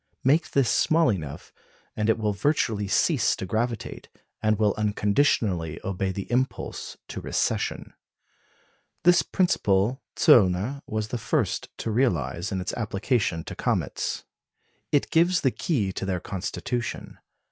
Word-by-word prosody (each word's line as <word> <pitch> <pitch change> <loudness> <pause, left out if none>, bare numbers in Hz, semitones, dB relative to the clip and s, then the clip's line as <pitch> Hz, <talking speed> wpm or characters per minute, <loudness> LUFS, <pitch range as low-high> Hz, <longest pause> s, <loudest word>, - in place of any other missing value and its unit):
Make 150 +5 +3
this 135 -3 +2
small 160 -4 +3
enough, 75 -7 -6 0.4
and 105 0 0
it 110 - +3
will 105 -2 0
virtually 110 -4 0
cease - - +2
to - - -5
gravitate, 115 +3 -3 0.3
and 110 -1 +2
will 105 -1 +2
unconditionally 105 - +1
obey 95 0 -2
the 100 +1 -4
impulse 125 0 -2
to - - -5
recession. - - -1 1.1
This 175 +1 +6
principle 115 - +1
Zöllner 115 - +4
was 110 0 -3
the 120 - -3
first - - -1
to 115 - -3
realise 90 - 0
in 95 -1 -2
its 90 - -3
application 105 -5 -1
to - - -7
comets. - - -2 0.7
It 145 - +1
gives 175 +2 +3
the 130 - +2
key 110 - -1
to 95 - -4
their 90 -2 -1
constitution. 105 +6 -4
110 Hz, 135 wpm, -26 LUFS, 95-130 Hz, 1.1 s, This